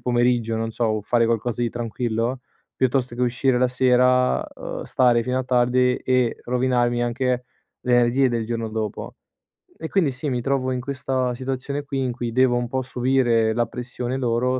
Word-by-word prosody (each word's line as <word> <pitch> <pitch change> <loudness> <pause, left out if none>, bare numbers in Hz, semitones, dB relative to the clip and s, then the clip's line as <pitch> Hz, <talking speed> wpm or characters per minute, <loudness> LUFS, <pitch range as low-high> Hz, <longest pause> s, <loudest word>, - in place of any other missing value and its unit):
pomeriggio, 120 -2 +1
non 115 0 -2
so, 120 - -1
o 110 -1 -1
fare 115 +2 +2
qualcosa 115 +1 -1
di 120 - +1
tranquillo, 120 +1 -2 0.4
piuttosto 130 -1 0
che 125 - -1
uscire 125 +1 +1
la 125 - +3
sera, 125 0 +3
uhm, - - -6
stare 120 -2 +3
fino 125 0 -1
a 130 - 0
tardi 125 0 +2
e 125 -2 0
rovinarmi 120 -1 +1
anche 125 +1 -1 0.4
le 125 - -1
energie 120 +2 +4
del 115 -2 -2
giorno 115 -1 -3
dopo. 110 -1 -5 0.6
E 160 - -6
quindi 170 -9 +2
sì, 130 +3 -4
mi 125 -2 -1
trovo 130 0 0
in 125 - -1
questa 130 -1 -2
situazione 135 +2 -4
qui 140 -1 -4
in 130 -2 0
cui 120 -1 -4
devo 130 0 +3
un 120 0 -1
po' 130 +1 -1
subire 125 -3 +1
la 120 0 +1
pressione 125 +1 -4
loro, 125 +1 0
125 Hz, 180 wpm, -23 LUFS, 120-130 Hz, 0.6 s, energie